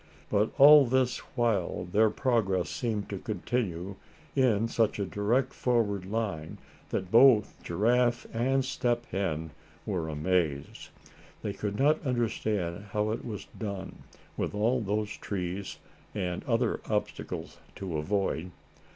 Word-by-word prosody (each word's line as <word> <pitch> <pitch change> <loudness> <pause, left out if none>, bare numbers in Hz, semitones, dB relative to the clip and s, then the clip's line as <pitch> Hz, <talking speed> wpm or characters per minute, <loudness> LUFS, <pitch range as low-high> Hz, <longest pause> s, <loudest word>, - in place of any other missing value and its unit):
But 105 +1 +3
all 145 -1 +9
this 125 0 +1 0.2
while 110 -7 0
their 105 +5 +3
progress 105 - +1
seemed 110 -4 -2
to 100 - -3
continue 100 -4 -3 0.4
in 115 -5 +3
such 115 -1 +1
a 100 - -1
direct 115 +7 0
forward 105 -6 0
line 100 -8 -3 0.3
that 95 -1 -3
both 115 -3 +6
Giraffe 120 +6 +1
and 130 +3 +1
Step 120 -2 0
Hen 80 -5 -2 0.3
were 90 -7 -2
amazed. 75 -2 -1 0.5
They 100 - -2
could 100 +1 -3
not 150 +4 +3
understand 110 - -1
how 105 0 +1
it 115 - -3
was 105 -4 -6
done, 100 -4 -5 0.4
with - - -2
all 120 +4 +2
those 105 0 -2
trees, 95 0 -4 0.4
and 90 -4 -2
other 115 -1 +1
obstacles, 105 -1 -3 0.2
to 90 -5 -4
avoid. 95 0 -1
105 Hz, 125 wpm, -29 LUFS, 95-120 Hz, 0.5 s, all